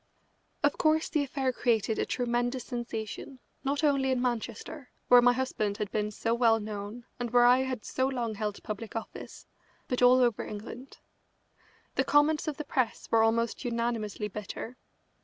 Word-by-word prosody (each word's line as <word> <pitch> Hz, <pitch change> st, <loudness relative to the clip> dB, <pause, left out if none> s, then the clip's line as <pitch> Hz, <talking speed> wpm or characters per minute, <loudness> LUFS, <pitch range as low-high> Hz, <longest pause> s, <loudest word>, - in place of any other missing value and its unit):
Of 290 Hz, -, +2 dB
course 315 Hz, 0 st, +2 dB
the 305 Hz, -, +1 dB
affair 265 Hz, -2 st, -1 dB
created 225 Hz, -3 st, +1 dB
a -, -, 0 dB
tremendous 245 Hz, 0 st, -1 dB
sensation, 240 Hz, +1 st, -5 dB, 0.3 s
not 280 Hz, +3 st, -1 dB
only 275 Hz, -3 st, +3 dB
in 260 Hz, -1 st, +1 dB
Manchester, 245 Hz, +2 st, -3 dB, 0.2 s
where 245 Hz, 0 st, +9 dB
my 245 Hz, 0 st, +6 dB
husband 220 Hz, -5 st, -1 dB
had 210 Hz, -2 st, -3 dB
been 210 Hz, 0 st, 0 dB
so 225 Hz, +2 st, -1 dB
well 230 Hz, -2 st, +4 dB
known 210 Hz, +2 st, -6 dB
and 240 Hz, -1 st, -2 dB
where 240 Hz, +1 st, +5 dB
I 250 Hz, +1 st, +6 dB
had 260 Hz, -4 st, -3 dB
so 260 Hz, 0 st, 0 dB
long 240 Hz, -4 st, -2 dB
held 210 Hz, -1 st, -4 dB
public 215 Hz, 0 st, -6 dB
office, 225 Hz, -, -7 dB, 0.4 s
but 250 Hz, -, -1 dB
all 250 Hz, +1 st, +7 dB
over 240 Hz, -4 st, +2 dB
England. 230 Hz, +5 st, -8 dB, 1.0 s
The -, -, +2 dB
comments 300 Hz, +2 st, +3 dB
of 300 Hz, -, -2 dB
the 300 Hz, -, -5 dB
press 255 Hz, -5 st, -1 dB
were 225 Hz, -, +5 dB
almost 230 Hz, +2 st, +1 dB
unanimously 230 Hz, -3 st, -2 dB
bitter. 210 Hz, +4 st, -7 dB
240 Hz, 165 wpm, -29 LUFS, 220-260 Hz, 1.0 s, where